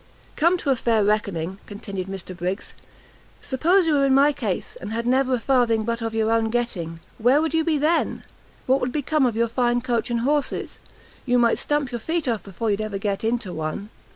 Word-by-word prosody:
"Come 340 +4 +3
to 285 -5 0
a - - +4
fair 230 -3 +2
reckoning," 195 -3 -1
continued 200 -3 -6
Mr 190 -1 -7
Briggs; 180 +4 -4 0.7
"suppose 340 +8 +2
you 320 - +2
were 280 -1 +3
in 265 -1 +4
my 285 +2 +5
case, 220 -10 -3
and 205 - -6
had 230 +1 -2
never 260 +1 +2
a - - -3
farthing 235 -3 +2
but 230 +1 -2
of 225 -1 -3
your 220 0 +1
own 225 -1 +2
getting; 180 -9 -2 0.2
where 250 +6 +4
would 320 +1 -1
you 325 0 +2
be 315 -2 +1
then? 310 +4 +1 0.4
What 265 +2 +2
would 250 - -1
become 300 0 +1
of 235 - -2
your 235 +1 +2
fine 240 +1 +1
coach 240 -2 -1
and 235 -1 0
horses? 290 +3 -1 0.4
you 245 -1 +2
might 235 -1 +3
stump 295 -3 -1
your 240 - -3
feet 320 +4 -2
off 230 -4 0
before 205 +3 -3
you'd 200 +1 0
ever 215 -2 -3
get 200 0 -2
into 225 -5 -1
one. 160 +6 -4
235 Hz, 210 wpm, -23 LUFS, 210-275 Hz, 0.7 s, my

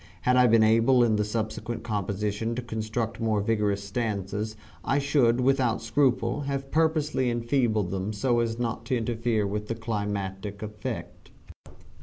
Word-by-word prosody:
Had 125 - +3
I 125 0 +6
been 115 -1 +5
able 115 +3 +5
in 110 -2 +3
the 105 - +1
subsequent 110 +1 -3
composition 105 +1 -2
to 125 - -4
construct 110 0 -3
more 110 -2 +1
vigorous 105 -2 0
stanzas 105 0 -3 0.3
I 135 - +1
should 135 -4 +3
without 130 -2 +2
scruple 125 +2 +1
have 135 0 -3
purposely 155 -4 +1
enfeebled 115 -5 0
them 95 +2 -2
so 120 +3 +1
as 115 -1 -1
not 115 -1 -2
to 125 +2 0
interfere 115 -2 0
with 105 +1 -3
the 115 - -2
climacteric 100 -2 -4
effect. 105 0 -6
115 Hz, 150 wpm, -27 LUFS, 105-120 Hz, 0.3 s, I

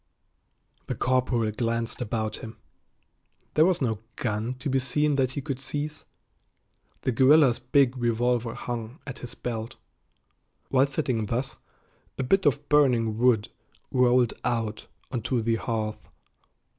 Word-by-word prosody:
The - - -2
corporal 125 -3 +1
glanced 115 +2 -2
about 110 -2 -2
him. 110 0 -9 1.0
There 155 +2 +5
was 180 -6 +1
no 110 -4 0 0.2
gun 110 +2 -2
to 130 +3 -6
be 135 -1 +2
seen 145 +3 +1
that 130 -2 +1
he 140 - -3
could 135 -3 -3
seize. 150 +2 -3 1.0
The 130 - +1
guerrilla's 130 +1 +5
big 130 0 +3
revolver 120 0 0
hung 120 +3 -5
at 135 -2 -7
his 120 -1 -8
belt. 115 -2 -5 0.9
While 135 +1 +4
sitting 130 -6 -1
thus, 125 +5 -2 0.6
a 135 - -1
bit 190 +6 +3
of 145 +1 +1
burning 120 -7 +3
wood 120 -4 +3 0.4
rolled 125 -2 +3
out 115 -3 -2 0.2
onto 125 0 -1
the 115 0 +1
hearth. 110 -2 -3
125 Hz, 130 wpm, -26 LUFS, 115-135 Hz, 1.0 s, There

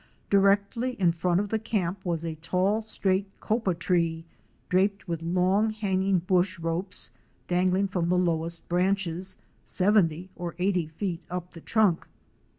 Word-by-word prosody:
Directly 200 +5 +3
in 175 -3 +4
front 175 +1 +1
of 205 0 -2
the 220 - 0
camp 190 -4 -2
was 170 -2 -2
a 165 - -2
tall, 185 +7 0
straight 195 -3 0
Copa 215 -5 0
tree 165 -2 0 0.4
draped 195 +2 +1
with 165 -2 -3
long 185 +5 +2
hanging 195 -3 +1
bush 185 +2 +1
ropes 170 +3 -3 0.4
dangling 185 +2 +2
from 180 -3 -1
the 180 - +3
lowest 170 -1 -1
branches, 185 0 0 0.3
seventy 185 -3 +2
or 175 -1 -5
eighty 180 -3 +1
feet 170 +2 -4
up 180 0 -5
the 165 - -11
trunk. 210 -5 +2
185 Hz, 145 wpm, -27 LUFS, 170-200 Hz, 0.4 s, in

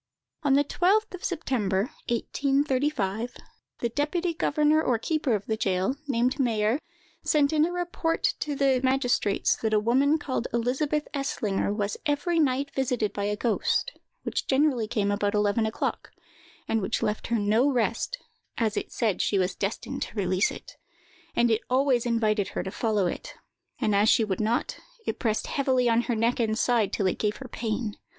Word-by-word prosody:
On 285 -3 +2
the 285 - +4
12th 370 +5 +1
September, 235 - 0 0.3
1835, 260 -3 0 0.5
the 235 - 0
deputy 330 +7 -1
governor 305 -1 +2
or 245 -6 +1
keeper 290 0 0
of 205 - -4
the 220 - -1
jail, 195 +3 0
named 255 +1 +1
Mayer, 225 0 +1 0.4
sent 295 -1 +2
in 305 0 +4
a - - -4
report 350 -2 -2 0.2
to 295 -1 -2
the 270 -2 +2
magistrates 250 -6 +2
that 220 -1 0
a - - +5
woman 265 +8 +3
called 260 -5 -3
Elizabeth 275 +6 0
Eslinger 245 -9 -1
was 205 -1 -2
every 325 +4 +1
night 280 -1 +1
visited 250 -5 0
by 200 - -2
a 210 0 0
ghost, 235 - 0 0.3
which - - -3
generally 265 -5 +2
came 205 -3 0
about 205 0 0
eleven 210 +2 +2
o'clock, 220 - -3 0.6
and 225 - +1
which 195 - -1
left 210 0 -1
her 235 - +1
no 220 +6 +3
rest, 235 - 0 0.4
as 220 -2 0
it - - -3
said 215 -6 0
she 200 - +1
was 185 0 +1
destined 195 +3 -4
to - - -4
release 185 -1 +1
it, - - -10 0.6
and 235 0 +3
it 220 - +2
always 255 -2 +2
invited 215 -3 +1
her - - -4
to 190 - -5
follow 210 -3 0
it; 175 - -4 0.4
and 210 - +1
as 205 +2 +4
she 225 - +5
would 195 -3 -2
not, 225 +2 -1 0.3
it - - -3
pressed 220 -2 0
heavily 260 -3 +1
on 230 0 +4
her 240 -1 -2
neck 230 +3 +1
and 220 -2 +1
side 230 -5 +2
till 200 - -1
it 185 - 0
gave 210 -1 0
her 265 - -8
pain. 225 -2 -3
235 Hz, 175 wpm, -27 LUFS, 210-280 Hz, 0.6 s, a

